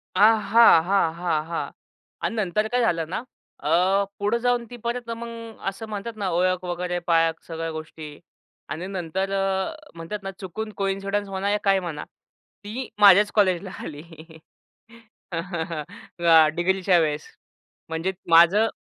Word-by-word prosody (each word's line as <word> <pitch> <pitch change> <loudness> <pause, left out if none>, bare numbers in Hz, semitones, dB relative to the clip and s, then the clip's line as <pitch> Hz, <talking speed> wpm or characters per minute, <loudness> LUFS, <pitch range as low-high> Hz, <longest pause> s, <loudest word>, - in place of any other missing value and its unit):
अ, - - 0
हां, 215 -3 +6
हां, 180 -3 +2
हां, 165 -3 -1
हां 165 0 -4 0.5
आणि 230 - -2
नंतर 215 +1 0
काय 245 +2 0
झालं 165 -8 0
ना, 180 - -2 0.4
अ, 180 +6 +2
पुढं 205 +3 +1
जाऊन 245 -1 +2
ती 245 - -9
परत 235 0 -3
मग 230 -1 -7
असं 220 +3 -8
म्हणतात 215 +2 -5
ना, 200 -3 -2
ओळख 185 +1 +1
वगैरे 175 0 -2
पाळख 165 -1 +2
सगळ्या 165 0 -4
गोष्टी 155 -1 -8 0.6
आणि 180 +4 -5
नंतर 190 +1 -3
अ, 195 +7 -1 0.2
म्हणतात 170 +5 -6
ना, 195 - -4
चुकून 215 +3 -6
कोइन्सिडन्स 195 +1 -2
म्हणा, 195 +1 -2
या 210 - +2
काय 195 -1 +3
म्हणा, 170 -5 -5 0.6
ती 230 +5 -5
माझ्याच 205 +1 +7
कॉलेजला 190 -2 +2
आली. 150 -2 -8 1.3
अ, 165 -1 +1
डिग्रीच्या 185 +1 +2
वेळेस 155 -1 -1 0.6
म्हणजे 165 +4 -2 0.2
माझं 175 +7 +6
190 Hz, 140 wpm, -24 LUFS, 170-210 Hz, 1.3 s, माझ्याच